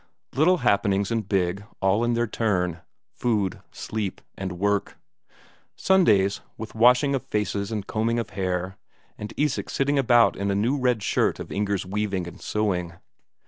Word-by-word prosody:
Little 170 Hz, +6 st, +4 dB
happenings 100 Hz, -2 st, +2 dB
and 110 Hz, -4 st, -2 dB
big, 95 Hz, 0 st, 0 dB, 0.2 s
all 100 Hz, +4 st, +2 dB
in 120 Hz, 0 st, +1 dB
their 120 Hz, 0 st, +1 dB
turn: 90 Hz, -7 st, -1 dB, 0.3 s
food, 105 Hz, -6 st, -1 dB
sleep, 105 Hz, -3 st, -4 dB, 0.2 s
and 95 Hz, -1 st, -4 dB
work; 100 Hz, +1 st, 0 dB, 0.8 s
Sundays, 105 Hz, -, +3 dB, 0.2 s
with 110 Hz, 0 st, -7 dB
washing 125 Hz, +5 st, +4 dB
of 135 Hz, -, 0 dB
faces 105 Hz, -1 st, -2 dB
and 105 Hz, -3 st, -3 dB
combing 115 Hz, +2 st, 0 dB
of 115 Hz, -, -3 dB
hair, 95 Hz, 0 st, -2 dB, 0.4 s
and 105 Hz, -, -6 dB
Isak 150 Hz, -2 st, 0 dB
sitting 140 Hz, +1 st, +1 dB
about 120 Hz, -3 st, +4 dB
in 100 Hz, +1 st, -2 dB
a 100 Hz, -, +1 dB
new 115 Hz, +7 st, +1 dB
red 125 Hz, -6 st, +1 dB
shirt -, -, +1 dB
of -, -, -7 dB
Inger's 100 Hz, -2 st, -1 dB
weaving 100 Hz, -1 st, -2 dB
and 85 Hz, -, -11 dB
sewing. 90 Hz, -5 st, -1 dB
105 Hz, 155 wpm, -25 LUFS, 95-120 Hz, 0.8 s, Little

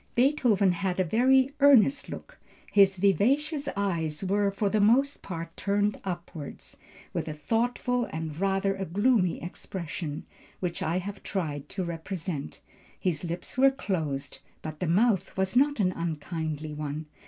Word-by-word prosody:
"Beethoven 240 Hz, -7 st, +3 dB
had 185 Hz, +1 st, -2 dB
a -, -, +4 dB
very 260 Hz, -, +4 dB
earnest 275 Hz, -1 st, +5 dB
look; -, -, -9 dB, 0.3 s
his 195 Hz, -2 st, +5 dB
vivacious 275 Hz, -, +2 dB
eyes 170 Hz, -5 st, -1 dB
were 200 Hz, +1 st, +2 dB
for 200 Hz, +1 st, -1 dB
the 215 Hz, +2 st, +1 dB
most 265 Hz, +7 st, +3 dB
part 165 Hz, -2 st, -6 dB
turned 205 Hz, +1 st, 0 dB
upwards, 175 Hz, -5 st, -6 dB, 0.4 s
with -, -, -2 dB
a 155 Hz, -, -4 dB
thoughtful 240 Hz, -, 0 dB
and 160 Hz, -1 st, -5 dB
rather 195 Hz, 0 st, +1 dB
a 195 Hz, -, -3 dB
gloomy 200 Hz, 0 st, +2 dB
expression, 170 Hz, -3 st, -5 dB, 0.3 s
which 175 Hz, -2 st, -3 dB
I 165 Hz, +3 st, 0 dB
have 200 Hz, +2 st, -5 dB
tried 150 Hz, -7 st, -3 dB
to 190 Hz, -, -3 dB
represent. 170 Hz, -2 st, -5 dB, 0.4 s
His 175 Hz, -4 st, -1 dB
lips 175 Hz, +8 st, -5 dB
were 270 Hz, +1 st, +7 dB
closed, 155 Hz, -, -3 dB, 0.2 s
but 155 Hz, -1 st, -6 dB
the 180 Hz, -, -1 dB
mouth 195 Hz, +4 st, +2 dB
was 190 Hz, +3 st, 0 dB
not 285 Hz, +1 st, +3 dB
an 185 Hz, -3 st, +3 dB
unkindly 160 Hz, -2 st, -4 dB
one. 150 Hz, +1 st, -4 dB
190 Hz, 145 wpm, -28 LUFS, 165-220 Hz, 0.4 s, were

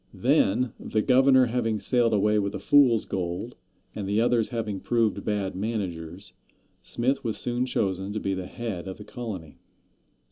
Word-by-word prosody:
Then, 115 Hz, +4 st, +2 dB
the 110 Hz, -1 st, -1 dB
governor 130 Hz, 0 st, +5 dB
having 115 Hz, -2 st, -1 dB
sailed 120 Hz, -1 st, +2 dB
away 105 Hz, 0 st, +3 dB
with 100 Hz, -1 st, -2 dB
the -, -, -4 dB
fool's 135 Hz, -6 st, +4 dB
gold, 90 Hz, -2 st, -4 dB, 0.4 s
and 100 Hz, -2 st, -5 dB
the 105 Hz, +2 st, +2 dB
others 115 Hz, -1 st, +2 dB
having 110 Hz, -5 st, -3 dB
proved 115 Hz, -1 st, 0 dB
bad 100 Hz, -3 st, -2 dB
managers, 95 Hz, -4 st, -4 dB, 0.5 s
Smith 130 Hz, +4 st, -1 dB
was 115 Hz, -3 st, -2 dB
soon 125 Hz, +1 st, -1 dB
chosen 95 Hz, -4 st, -1 dB
to 110 Hz, -, -2 dB
be 95 Hz, -, -2 dB
head 95 Hz, 0 st, -5 dB
of 95 Hz, -, -6 dB
the 105 Hz, -, -9 dB
colony. 100 Hz, -11 st, -7 dB
110 Hz, 155 wpm, -26 LUFS, 95-120 Hz, 0.5 s, governor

